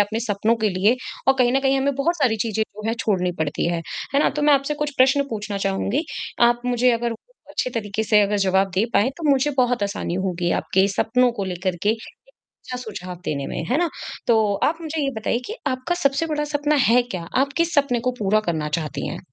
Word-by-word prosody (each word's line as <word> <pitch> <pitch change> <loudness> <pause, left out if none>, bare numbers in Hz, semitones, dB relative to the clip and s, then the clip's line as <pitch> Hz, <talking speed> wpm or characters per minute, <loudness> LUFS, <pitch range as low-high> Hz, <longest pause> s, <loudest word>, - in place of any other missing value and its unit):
अपने 210 +2 0
सपनों 215 0 +1
के 220 -2 +1
लिए। 205 +6 +2 0.3
और 270 - +7
कहीं 245 -1 +4
न 270 - +2
कहीं 270 0 +2
हमें 280 0 +1
बहुत 325 +6 0
सारी 255 -8 +2
चीज़ें 220 -1 -1
जो 215 0 -8
हैं 225 - +1
छोड़नी 185 -7 0
पड़ती 155 0 -1
है। 170 -1 -1 0.3
है 285 - +4
न? - - +3
तो 295 - -3
मैं 295 - +5
आपसे 275 +2 0
कुछ 295 0 -2
प्रश्न 265 +2 +4
पूछना 210 -2 -4
चाहूँगी। 195 +9 -1 0.4
आप 240 0 0
मुझे 250 0 +3
अगर 235 0 0
उ, - - -5 0.4
अच्छे 255 - -2
तरीके 220 -3 -2
से 210 -1 +5
अगर 205 +1 +1
जवाब 190 +1 +2
दे 195 - +3
पाएंँ 235 +6 +4
तो 320 -3 -2
मुझे 275 +1 +3
बहुत 245 -3 +2
आसानी 200 -3 -2
होगी 175 -2 -1
आपके 190 +1 +2
सपनों 245 +5 +2
को 195 - -1
लेकर 185 0 -2
के 205 - +1
एक 225 0 -3 0.6
अच्छा 250 - -5
सुझाव 195 -7 -7
देने 140 -2 -2
में, - - -4
है 250 - 0
न? - - 0 0.4
तो 220 -3 +3
आप 320 +2 +1
मुझे 315 -1 -3
ये 275 - 0
बताइए 225 +2 0
कि 435 - -5
आपका 260 +6 -1
सबसे 280 -1 +1
बड़ा 300 -2 -1
सपना 295 0 0 0.2
है 245 +1 +5
क्या? 185 -8 -6
आप 275 +1 +2
किस 335 +1 +1
सपने 275 -5 +2
को 255 +2 0
पूरा 210 +2 +3
करना 155 -2 -2
चाहती 155 -2 -4
हैं? - - -5
235 Hz, 230 wpm, -22 LUFS, 200-275 Hz, 0.6 s, और